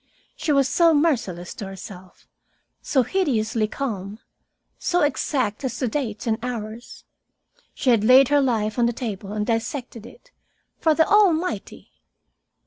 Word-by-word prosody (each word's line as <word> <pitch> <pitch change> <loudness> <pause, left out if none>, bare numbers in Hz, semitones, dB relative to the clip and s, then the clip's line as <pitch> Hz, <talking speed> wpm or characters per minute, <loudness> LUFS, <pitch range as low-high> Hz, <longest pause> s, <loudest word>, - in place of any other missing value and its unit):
She 310 - -2
was 275 -2 +3
so 335 +3 +4
merciless 230 - 0
to 200 - -7
herself, 190 -1 -11 0.6
so 265 -3 +1
hideously 225 - 0
calm, 210 -5 -5 0.6
so 355 0 0
exact 270 -5 -1
as 255 -3 -3
to 255 - -1
dates 225 -4 -3
and 225 -1 0
hours. 230 -1 -6 0.7
She 255 - +1
had 225 -3 +3
laid 255 +3 +6
her 290 0 +4
life 225 -3 0
on 235 - +4
the 240 - -1
table 210 -5 -5
and 210 0 -2
dissected 230 0 -3
it - - -18 0.5
for 315 -2 +3
the 320 - +3
Almighty! 365 - +1
240 Hz, 140 wpm, -23 LUFS, 215-290 Hz, 0.7 s, laid